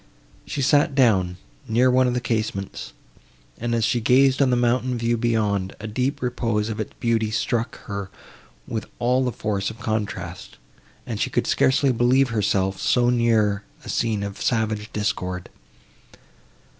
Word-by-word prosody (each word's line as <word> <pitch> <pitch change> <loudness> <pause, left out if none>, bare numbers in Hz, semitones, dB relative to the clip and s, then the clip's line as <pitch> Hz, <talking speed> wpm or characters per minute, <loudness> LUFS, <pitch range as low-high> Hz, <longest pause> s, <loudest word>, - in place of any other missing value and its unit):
She 140 - -2
sat 145 +1 +3
down, 95 -9 +3 0.3
near 125 +3 +3
one 130 0 +4
of 125 - 0
the 125 - 0
casements, 110 -5 -3 0.7
and, 120 0 -1
as 115 - +1
she 120 +1 +1
gazed 130 +4 +4
on 135 - +4
the 125 - +3
mountain 125 +1 +1
view 115 0 +1
beyond, 105 -5 0
the - - -8
deep 125 +6 -2
repose 115 -3 -1
of 110 - -4
its 110 - -4
beauty 115 -2 +1
struck 115 +2 -1
her 100 -2 -5 0.6
with 110 -2 -4
all 125 +2 +2
the 125 - 0
force 100 -4 -2
of 110 - -9
contrast, 100 -6 -4 0.5
and - - -4
she - - +1
could - - 0
scarcely 130 +1 +3
believe 125 +2 +3
herself 95 -3 0
so 120 -1 +3
near 110 -4 +2 0.2
a - - -8
scene 110 -3 0
of 100 0 -6
savage 110 -2 -1
discord. 90 -4 -3
115 Hz, 155 wpm, -23 LUFS, 105-125 Hz, 0.7 s, one